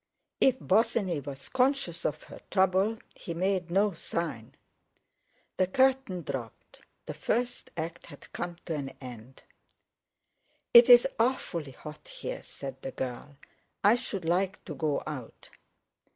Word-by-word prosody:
If 260 -1 +4
Bosinney 205 - +2
was 140 -1 -8
conscious 255 - +1
of 150 +1 -1
her - - -11
trouble 190 +3 +3 0.2
he 170 - -7
made 185 0 0
no 200 +3 +3
sign. 160 -8 -4 1.0
The 185 - +3
curtain 260 -5 +2
dropped. 120 -6 -7 0.2
The - - -5
first 245 +2 -2
act 165 +1 -5
had - - -14
come 175 -1 -4
to 165 - -2
an 140 -3 -4
end. 125 -1 -11 1.3
"It's 240 +1 +10
awfully 175 - 0
hot 150 +4 -11
here!" - - -6
said 135 -1 -8
the - - -4
girl; 130 +3 -5 0.5
"I 205 - +7
should 225 -7 -3
like 185 +4 0
to 165 - -5
go 145 0 -1
out." 140 -7 -8
175 Hz, 130 wpm, -29 LUFS, 145-215 Hz, 1.3 s, It's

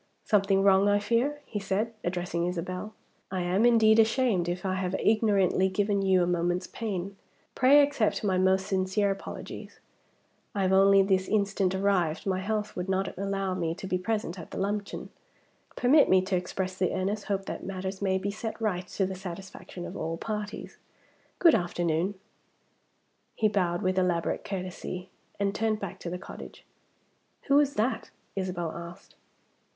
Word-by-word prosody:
"Something 195 -3 +3
wrong, 195 0 +5
I 205 - +4
fear?" 235 +8 0
he 210 - -4
said, 200 +4 -1
addressing 175 -1 -1
Isabel. 180 +4 -4 0.3
"I 185 -1 -2
am, 190 +6 +3
indeed, 225 -2 +5
ashamed 220 -6 +2
if 180 +2 -4
I 190 - 0
have 185 0 -1
ignorantly 200 -4 +3
given 200 +1 0
you 190 -2 +3
a - - +2
moment's 175 +1 0
pain. 195 -3 -4 0.4
Pray 280 +3 +6
accept 280 -8 0
my 195 -3 +1
most 190 0 +3
sincere 190 +1 +1
apologies. 195 - -7 0.8
I 200 - +1
have 190 0 +2
only 195 0 +6
this 190 -1 +1
instant 200 -3 +1
arrived; 190 -5 +1
my 190 -2 0
health 210 +2 -2
would 180 +1 -4
not 190 0 -1
allow 195 -1 -2
me 170 -3 -2
to 190 - -8
be 185 -1 -1
present 195 -2 -2
at 165 - -9
the - - -7
luncheon. 200 +1 -3 0.6
Permit 280 +5 +5
me 185 0 +5
to 190 0 -1
express 185 +1 -3
the 185 -1 0
earnest 200 +3 -2
hope 195 -2 -2
that - - -6
matters 190 0 -5
may 190 -1 +2
be 200 +2 -2
set 220 +2 -5
right 185 -5 -1
to 195 - -1
the 190 - -3
satisfaction 185 -1 -8
of - - -7
all 165 +1 -3
parties. 210 +2 -5 0.6
Good 335 -3 +6
afternoon!" 175 +2 0 1.2
He 220 - +3
bowed 180 -4 0
with 185 0 +1
elaborate 175 -2 0
courtesy, 185 -1 -5 0.3
and 200 -1 +1
turned 220 -1 0
back 200 -4 -6
to 170 - -5
the 180 - -4
cottage. 180 - -11 0.8
"Who 280 +1 +4
is 285 -1 +1
that?" 230 +5 -1 0.3
Isabel 180 -4 -2
asked. 170 +3 -10
190 Hz, 165 wpm, -28 LUFS, 185-210 Hz, 1.2 s, Pray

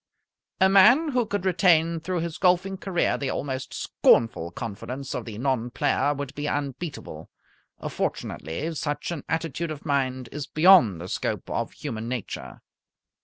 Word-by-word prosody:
A 190 - +6
man 215 +12 +6
who 250 -5 +1
could 205 -2 -2
retain 170 -3 +3
through 175 +1 -2
his 165 -1 -5
golfing 185 +1 +2
career 190 -2 0
the 140 - -2
almost 130 -2 -3
scornful 115 -7 +2
confidence 120 +8 -6
of 120 - -4
the 110 -3 -7
non 125 -1 0
player 145 +3 +1
would 140 -1 -5
be 145 +1 -4
unbeatable. 140 - -5 0.6
Fortunately 115 - -3
such 150 +1 -3
an 160 -5 -5
attitude 165 0 -2
of 155 -1 -7
mind 130 -4 -1
is 145 -1 -5
beyond 155 - +6
the 90 - -6
scope - - -3
of - - -2
human 115 -6 -5
nature. 125 -4 -6
145 Hz, 150 wpm, -25 LUFS, 130-175 Hz, 0.6 s, A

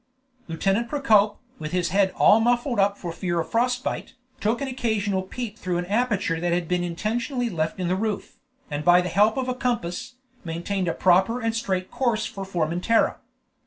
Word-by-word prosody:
Lieutenant 195 +7 0
Procope, 215 -8 +3 0.2
with 155 +1 -5
his 180 -1 +1
head 195 0 +3
all 215 - +6
muffled 240 +1 +1
up 200 +1 +3
for 175 - -5
fear 175 0 -2
of 165 - -4
frost 250 +2 +1
bite, - - -4 0.2
took 220 +3 0
an 275 - -3
occasional 220 -6 -1
peep 220 +3 -6
through 180 -1 -2
an 175 - -2
aperture 205 -5 0
that 175 +1 -1
had 175 -1 0
been 180 0 0
intentionally 230 - -2
left 160 +2 -2
in 180 - -1
the 180 - +1
roof, 215 +1 -3 0.3
and 145 0 -2
by 175 +1 +6
the 180 - -3
help 210 +6 +3
of 260 -1 -1
a 255 - 0
compass, 250 -1 -3 0.3
maintained 175 +3 -2
a 165 - -1
proper 190 +6 +3
and 225 -1 -1
straight 185 -5 -2
course 235 -5 0
for 195 - -6
Formentera. 180 +4 +1
200 Hz, 190 wpm, -24 LUFS, 175-235 Hz, 0.3 s, all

